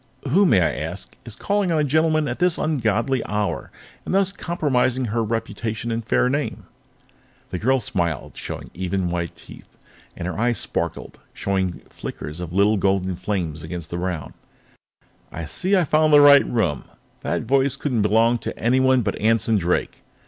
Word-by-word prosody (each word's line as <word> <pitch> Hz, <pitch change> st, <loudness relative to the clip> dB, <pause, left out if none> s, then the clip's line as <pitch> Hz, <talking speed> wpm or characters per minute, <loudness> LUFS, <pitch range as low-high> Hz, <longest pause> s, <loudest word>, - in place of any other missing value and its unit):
"Who, 190 Hz, +8 st, +4 dB
may 100 Hz, -, +4 dB
I 80 Hz, -, +2 dB
ask, 80 Hz, +5 st, -5 dB
is 115 Hz, -, -8 dB
calling 200 Hz, -3 st, 0 dB
on 165 Hz, -, +2 dB
a 150 Hz, -, +2 dB
gentleman 155 Hz, +1 st, +2 dB
at 120 Hz, -, -4 dB
this 180 Hz, -1 st, +2 dB
ungodly 130 Hz, -3 st, 0 dB
hour, 105 Hz, -1 st, -2 dB, 0.3 s
and -, -, -2 dB
thus 195 Hz, -1 st, +3 dB
compromising 130 Hz, -9 st, 0 dB
her 115 Hz, +1 st, -1 dB
reputation 115 Hz, 0 st, -3 dB
and 115 Hz, 0 st, -2 dB
fair 115 Hz, -, +2 dB
name?" 145 Hz, +3 st, -2 dB, 0.9 s
The 90 Hz, -, -3 dB
girl 130 Hz, +6 st, +2 dB
smiled, 85 Hz, -, -2 dB
showing -, -, -7 dB
even, 90 Hz, 0 st, -2 dB
white 85 Hz, -1 st, -3 dB
teeth, -, -, -15 dB, 0.4 s
and 85 Hz, -, -4 dB
her 90 Hz, -, -4 dB
eyes 120 Hz, 0 st, +1 dB
sparkled, -, -, -4 dB, 0.2 s
showing 95 Hz, -3 st, -2 dB
flickers 75 Hz, +3 st, -7 dB
of 90 Hz, -2 st, -6 dB
little 100 Hz, +3 st, +3 dB
golden 95 Hz, -1 st, +1 dB
flames 90 Hz, -4 st, -3 dB
against 80 Hz, 0 st, -7 dB
the 85 Hz, -, -3 dB
brown. 90 Hz, -3 st, -4 dB, 1.0 s
"I 85 Hz, -, -5 dB
see 185 Hz, -, 0 dB
I've 175 Hz, -6 st, +2 dB
found 155 Hz, 0 st, +4 dB
the 145 Hz, -, +9 dB
right 140 Hz, -1 st, +7 dB
room," 90 Hz, -, -1 dB
she -, -, -26 dB, 0.3 s
said. -, -, -2 dB
"That -, -, -12 dB
voice 135 Hz, +1 st, +3 dB
couldn't 130 Hz, -5 st, -1 dB
belong 115 Hz, +3 st, +3 dB
to -, -, -5 dB
anyone 130 Hz, +2 st, +3 dB
but 100 Hz, -, -1 dB
Anson 115 Hz, 0 st, +3 dB
Drake." 90 Hz, -2 st, -1 dB
115 Hz, 175 wpm, -22 LUFS, 90-135 Hz, 1.0 s, the